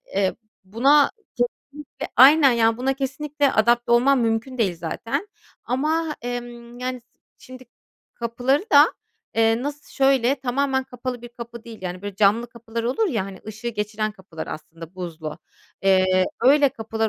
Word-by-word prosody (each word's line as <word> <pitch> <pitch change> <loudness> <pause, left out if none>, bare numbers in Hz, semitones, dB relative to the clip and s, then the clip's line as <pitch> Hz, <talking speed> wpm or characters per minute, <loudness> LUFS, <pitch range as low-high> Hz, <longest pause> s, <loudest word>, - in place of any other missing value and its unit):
eee, 195 -1 +1 0.3
buna 270 +9 +4 0.3
kesinlikle, 275 +4 -5
aynen, 275 +2 +8
ya 225 -1 +3
buna 260 +3 0
kesinlikle 280 +1 -1
adapte 235 +2 +2
olmam 255 +3 +4
mümkün 230 +3 -1
değil 195 -7 +1
zaten 230 - -4 0.4
ama, 305 +5 -1
emm, 240 0 -6
yani, 255 0 -4 0.4
şimdi 255 0 -12 0.5
kapıları 245 - 0
da, 290 +2 +7 0.4
eee, 225 +1 +2
nasıl, 290 +1 -6
şöyle 270 -2 +3
tamamen 265 0 -1
kapalı 250 -1 -6
bir 240 - -8
kapı 235 0 -10
değil. 230 -2 -10
Yani 180 0 -5
böyle 205 -1 -5
camlı 210 +4 +3
kapılar 230 -1 -6
olur 270 - +1
ya, 220 - -1
hani, 195 -1 -9
ışığı 220 +2 -5
geçiren 215 -1 -3
kapılar 190 -5 -9
aslında 165 +2 -9
buzlu. 165 -4 -6 0.4
Eee, 185 -1 +4 0.2
öyle 280 +3 +6
kapılar 225 -3 -3
235 Hz, 145 wpm, -23 LUFS, 215-270 Hz, 0.5 s, aynen